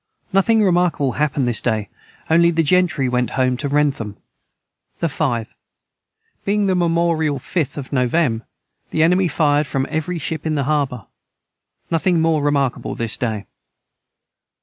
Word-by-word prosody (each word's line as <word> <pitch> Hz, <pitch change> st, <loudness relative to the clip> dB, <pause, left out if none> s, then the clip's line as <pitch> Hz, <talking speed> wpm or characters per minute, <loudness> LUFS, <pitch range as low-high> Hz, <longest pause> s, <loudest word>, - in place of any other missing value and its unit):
Nothing 215 Hz, +3 st, +4 dB
remarkable 175 Hz, -7 st, +2 dB
hapned 145 Hz, -1 st, 0 dB
this 120 Hz, -, +2 dB
day 110 Hz, -4 st, -1 dB, 0.4 s
onely 170 Hz, +1 st, +4 dB
the 165 Hz, -1 st, +1 dB
gentry 160 Hz, -4 st, +2 dB
went 125 Hz, 0 st, 0 dB
home 130 Hz, -1 st, +2 dB
to 140 Hz, -, -3 dB
Wrentham. 140 Hz, -7 st, 0 dB, 0.8 s
the 170 Hz, -, 0 dB
5. 130 Hz, -8 st, -2 dB, 0.9 s
Being 205 Hz, +1 st, +1 dB
the 190 Hz, -, +2 dB
memorial 165 Hz, -4 st, +1 dB
5th 140 Hz, +1 st, -3 dB
of 135 Hz, -2 st, -6 dB
novem. 125 Hz, -2 st, +1 dB, 0.5 s
the 160 Hz, -, +1 dB
enemy 180 Hz, +3 st, +3 dB
fired 150 Hz, -3 st, +2 dB
from 135 Hz, -1 st, -1 dB
every 160 Hz, +3 st, -2 dB
Ship 155 Hz, 0 st, -4 dB
in 155 Hz, -1 st, -1 dB
the 140 Hz, -, 0 dB
harbour 140 Hz, -6 st, -1 dB, 0.9 s
nothing 170 Hz, +1 st, +2 dB
more 160 Hz, -2 st, +2 dB
remarkable 140 Hz, -3 st, 0 dB
this 115 Hz, -2 st, -2 dB
day. 110 Hz, -4 st, -3 dB
150 Hz, 140 wpm, -20 LUFS, 130-170 Hz, 0.9 s, Nothing